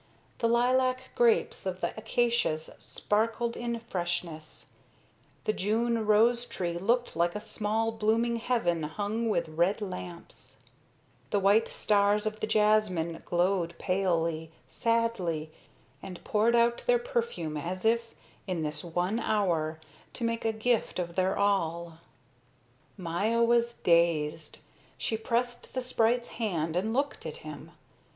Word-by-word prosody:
The 230 - +2
lilac 255 +2 +2
grapes 235 -4 +2
of 185 -1 -3
the - - -1
acacias 230 -8 0
sparkled 230 +2 -1
in 235 -1 -3
freshness, 175 -6 -4 0.8
the 215 - 0
June 225 +3 0
rose 235 +3 +4
tree 175 -2 -3
looked 235 +4 +1
like 170 +2 +1
a - - -2
small 220 +1 -1
blooming 225 +2 +1
heaven 225 -9 0
hung 205 +9 -2
with 170 -6 0
red 170 +7 +1
lamps, 90 - -8 0.7
the 205 - +1
white 200 +3 +4
stars 205 0 +2
of 215 0 -3
the 215 - -2
jasmine 210 -6 +2
glowed 175 -1 +1
palely, 170 -4 0 0.2
sadly, 210 -10 0 0.5
and 185 -2 -9
poured 220 +3 +2
out 235 0 +3
their - - +5
perfume 470 - -2
as 180 +6 -4
if, 230 +1 +1 0.3
in 180 -4 -2
this 150 -1 -3
one 180 +6 -1
hour, 170 -8 0 0.3
to 245 - -5
make 230 0 -1
a 225 - +3
gift 220 +1 0
of 175 -2 -3
their 185 +1 +1
all. 170 -4 0 1.0
Maya 200 +6 0
was 235 0 +2
dazed. 160 -3 +1 0.4
She 225 - -1
pressed 240 +3 -2
the 255 - -1
sprite's 240 -1 +1
hand 165 -8 -2
and 200 +5 0
looked 280 +4 -1
at - - -6
him. - - -9
210 Hz, 130 wpm, -29 LUFS, 170-230 Hz, 1.0 s, their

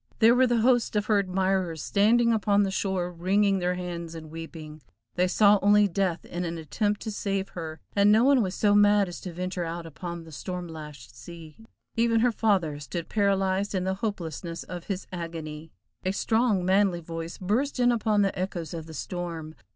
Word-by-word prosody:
There 230 +1 +6
were 255 +1 +4
the 235 -2 +2
hosts 245 -2 +2
of 210 0 +1
her 215 -2 +3
admirers 185 -4 0
standing 230 +3 +3
upon 205 -2 +2
the 195 - -1
shore 190 -2 -1
wringing 195 +3 +2
their 180 0 0
hands 170 -2 -5
and 155 -1 -9
weeping, 160 -1 -9 0.3
they 180 +1 +2
saw 205 +2 +5
only 205 +1 +5
death 185 -2 -1
in 175 +1 -4
an 170 -1 -3
attempt 205 +7 -1
to 220 - -4
save 195 -1 -2
her, 160 -2 -7 0.2
and 200 0 +5
no 220 +2 +5
one 275 -1 +5
was 185 -3 -2
so 205 -1 +3
mad 205 -1 +5
as 175 - -8
to 180 - -6
venture 180 +1 -3
out 165 0 -5
upon 170 +1 -7
the 165 - -13
storm 180 +4 -5
lashed 150 -7 -10
sea. 155 +5 -11 0.4
Even 230 -1 +2
her 245 +1 +3
father 190 -10 +1
stood 165 +3 -6
paralyzed 195 -1 +1
in 185 - 0
the 190 +1 0
hopelessness 170 -5 -4
of 175 -1 -8
his 195 -2 -4
agony. 160 -2 -6 0.3
A 185 +1 0
strong, 220 -3 +1
manly 190 -2 +2
voice 165 0 -6
burst 240 +9 -1
in 245 0 +4
upon 215 -3 +2
the 195 - 0
echoes 180 -3 -4
of 160 -1 -6
the 160 - -9
storm. 165 -1 -5
185 Hz, 195 wpm, -27 LUFS, 165-205 Hz, 0.4 s, There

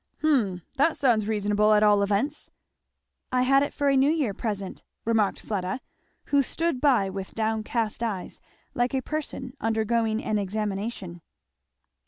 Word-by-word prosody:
] - - -39
"Hum 215 - +2
that 285 +4 +3
sounds 230 -7 +2
reasonable, 210 0 +2
at 210 0 +4
all 205 -1 +5
events." 205 +9 -1 0.8
"I 250 0 +2
had 275 +2 +4
it 285 - 0
for 285 - -1
a 275 - +4
New 270 +2 +4
Year 300 -10 +1
present," 200 -3 -4 0.2
remarked 220 -3 +1
Fleda, 190 +1 -3 0.5
who 285 -1 +4
stood 325 0 -1
by 255 -9 +4
with 190 0 -7
down 220 0 0
cast 225 -1 -2
eyes, 210 -6 -4 0.3
like 245 +1 0
a 260 - -1
person 280 -4 -5
undergoing 225 0 +1
an 215 -1 0
examination. 200 -2 -4
220 Hz, 155 wpm, -26 LUFS, 205-265 Hz, 0.8 s, all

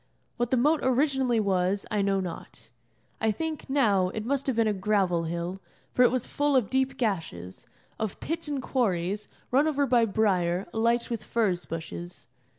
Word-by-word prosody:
What 240 -1 0
the 260 - +2
moat 300 +6 +3
originally 260 -2 +2
was 195 -1 +1
I 210 - +1
know 195 0 +2
not. 125 -10 -7 0.5
I 220 - +2
think, 315 +5 -4
now, 205 -10 +3
it 215 +3 -5
must 275 +2 -1
have 265 - +1
been 230 0 +3
a 215 - +2
gravel 190 -4 +1
hill, 170 +3 -4 0.3
for - - +2
it 250 - +7
was 255 -2 -1
full 290 -1 0
of 245 -7 +2
deep 265 0 +1
gashes, 165 - -3 0.3
of 215 -3 -3
pits 330 0 -3
and 280 -3 -3
quarries, 205 -5 0 0.2
run 280 +5 +4
over 285 -2 +1
by 240 -3 +4
briar, 190 -4 +1
alight 235 +2 +1
with 230 - -3
furze 195 -7 0
bushes. 90 - -7
220 Hz, 175 wpm, -27 LUFS, 185-260 Hz, 0.5 s, it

